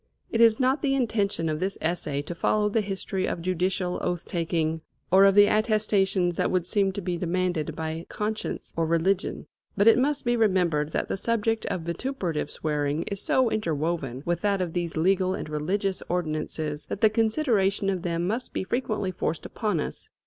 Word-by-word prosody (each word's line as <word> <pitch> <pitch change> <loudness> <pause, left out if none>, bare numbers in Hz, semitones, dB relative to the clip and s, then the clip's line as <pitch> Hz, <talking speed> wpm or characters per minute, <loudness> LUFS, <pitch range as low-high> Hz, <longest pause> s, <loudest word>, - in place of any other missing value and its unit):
It 230 - +1
is 225 -1 +6
not 260 +3 +2
the 275 -1 +1
intention 210 -9 0
of 155 -1 -1
this 190 +3 -2
essay 155 -4 -1
to 165 - -5
follow 210 +4 +1
the 220 +1 +1
history 195 -1 -3
of - - -2
judicial 180 +1 -1
oath 175 -1 -2
taking, 165 -2 -1 0.3
or 190 +2 +7
of 195 -1 +5
the 205 0 +8
attestations 205 -5 +2
that - - +1
would 180 -2 0
seem 195 +1 +2
to 200 - -4
be 175 -1 -2
demanded 180 -3 -1
by 160 +1 -4
conscience 215 +1 -4
or 165 -1 0
religion. 170 +4 0 0.3
But 205 +2 +4
it 225 - +7
must 285 +2 0
be 240 0 +2
remembered 180 -9 +2
that - - -1
the - - -2
subject 225 +1 0
of 180 - -2
vituperative 170 - -3
swearing 150 0 -1
is 200 +2 -4
so 255 -3 +2
interwoven 155 - -2
with 175 0 -1
that 200 -2 +1
of 175 -3 -2
these 170 -2 -2
legal 185 +2 +2
and - - -5
religious 185 +6 -1
ordinances, 155 -3 -2
that - - -5
the 220 - +6
consideration 220 -4 +1
of 190 -2 0
them 170 -1 -1
must 230 +7 -2
be - - -2
frequently 215 -2 -1
forced 165 -3 -3
upon 210 -7 -1
us. - - -5
185 Hz, 185 wpm, -26 LUFS, 165-210 Hz, 0.3 s, the